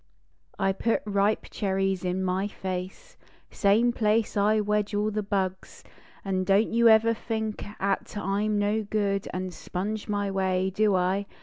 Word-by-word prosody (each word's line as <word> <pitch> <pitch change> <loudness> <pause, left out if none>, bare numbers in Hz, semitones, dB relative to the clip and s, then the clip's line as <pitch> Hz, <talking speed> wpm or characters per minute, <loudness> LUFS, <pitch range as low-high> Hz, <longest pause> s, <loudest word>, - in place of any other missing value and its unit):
I 195 -1 +2
put 230 +4 0
ripe 205 +1 +1
cherries 195 -2 -1
in 185 +1 -1
my 185 +2 0
face, 190 - -6 0.3
Same 220 +4 +3
place 220 -1 +1
I 210 +1 +3
wedge 210 0 0
all 210 +1 0
the 215 0 -1
bugs; 190 -2 -3 0.4
An 190 -1 0
don 195 +2 +4
t - - -6
you 235 0 +5
ever 225 +1 +5
think 220 -1 -4 0.2
At 195 +1 -2
I 200 +1 -1
m 215 -1 0
no 205 +2 +1
good 200 -2 -1
An 185 0 -4
sponge 200 +5 -4
my 205 -1 -1
way. 190 -1 0
Do 205 0 +2
I? 185 +2 0
200 Hz, 165 wpm, -27 LUFS, 190-215 Hz, 0.4 s, you